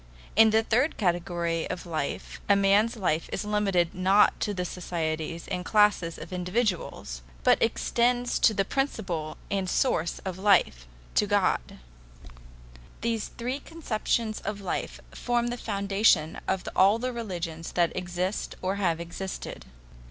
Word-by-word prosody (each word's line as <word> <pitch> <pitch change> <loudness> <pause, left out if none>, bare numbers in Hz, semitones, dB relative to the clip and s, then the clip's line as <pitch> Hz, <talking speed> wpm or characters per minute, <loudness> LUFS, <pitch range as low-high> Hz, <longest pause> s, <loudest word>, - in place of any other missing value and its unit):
In 220 +1 +7
the 220 +1 +3
third 250 +7 +1
theory 170 -2 -1
of 180 0 -5
life 160 -4 -4
a 200 - +7
man's 200 +4 +3
life 165 -5 0
is - - -3
limited 195 -5 +1
not 190 +3 +4
to 185 -4 -2
societies 165 -2 -3
and 180 - -3
classes 210 -5 +3
of - - -9
individuals, 180 - -2 0.2
but 250 - +4
extends 245 +2 +1
to 220 - +4
the 195 - +1
principle 190 - -2
and 195 -2 0
source 170 -10 +1
of 190 -1 -4
life 185 - +3 0.3
to - - +3
God. - - +1 1.2
These 230 -2 -1
three 250 +4 -4
conceptions 230 -8 -2
of 205 0 -4
life 195 - -4
form 240 -1 0
the 240 - -2
foundation 200 -6 +2
of 190 -1 -1
all 195 +4 +5
the 250 +2 -3
religious 175 -8 -5
that 175 -1 +1
exist 180 +2 -3
or 190 +2 0
have 170 -5 +1
existed. 170 +3 -6
195 Hz, 135 wpm, -27 LUFS, 175-220 Hz, 1.2 s, In